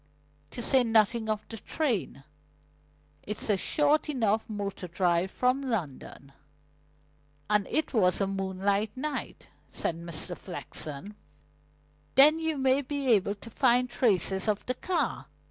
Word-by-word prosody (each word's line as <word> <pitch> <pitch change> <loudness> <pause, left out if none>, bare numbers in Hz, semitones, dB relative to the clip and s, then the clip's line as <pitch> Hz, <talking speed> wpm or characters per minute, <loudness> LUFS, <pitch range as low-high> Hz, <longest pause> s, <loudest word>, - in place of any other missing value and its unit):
To 240 - -5
say 265 0 +4
nothing 225 0 +2
of 215 -1 -2
the 225 - -8
train, 225 - -2 1.0
it's 210 +1 -3
a - - +4
short 295 +9 +2
enough 225 -6 0
motor 200 -3 -4
drive 175 +1 +1
from 255 +6 +1
London; 140 - -5 1.1
and 210 -2 +2
it 310 - -1
was 185 -6 +3
a 200 - +2
moonlight 195 +3 -1
night," 300 +3 -5 0.2
said 165 - -2
Mr. 170 +1 -3
Flexen. 175 0 -5 1.0
"Then 300 +4 +7
you 320 -2 -1
may 265 +1 +3
be 280 -1 -3
able 200 -1 +3
to 230 +3 -12
find 250 0 +3
traces 195 -4 +1
of 210 -1 0
the 255 - -1
car. 350 +6 -2
215 Hz, 130 wpm, -28 LUFS, 190-260 Hz, 1.1 s, Then